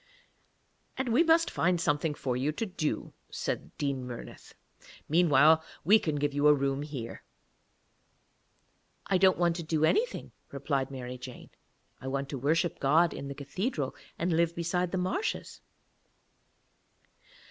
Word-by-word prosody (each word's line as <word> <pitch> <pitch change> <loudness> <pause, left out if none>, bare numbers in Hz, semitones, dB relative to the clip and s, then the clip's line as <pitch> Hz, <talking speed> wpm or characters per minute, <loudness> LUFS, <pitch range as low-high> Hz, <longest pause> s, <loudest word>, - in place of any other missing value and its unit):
'And 260 -1 -1
we 240 +7 +4
must 330 0 +4
find 175 +1 +1
something 145 0 0
for 130 -3 -2
you 135 +4 0
to 225 - -2
do,' 180 -6 -3 0.2
said - - -4
Dean 140 -3 -2
Murnith. 120 -1 -10 0.5
'Meanwhile 160 -1 +5 0.2
we 210 +7 +6
can 155 -6 -2
give 145 0 -1
you 145 +1 +3
a 150 - +7
room 135 0 -1
here.' 140 -6 -6 1.8
'I 190 -2 +1
don't 190 0 +5
want 175 -1 +1
to - - -3
do 155 -1 +1
anything,' 475 - 0 0.2
replied 140 -1 -1
Mary 125 -2 -7
Jane; 125 -1 -10 0.5
'I 130 - -7
want 135 +1 -2
to 135 - -4
worship 160 +5 +1
God 160 +4 +3
in 140 - -6
the 140 - -6
cathedral 145 - -3 0.2
and 170 +1 0
live 170 +1 +2
beside 175 +1 -1
the 190 - -1
marshes.' 185 - -2
155 Hz, 145 wpm, -29 LUFS, 140-175 Hz, 1.8 s, a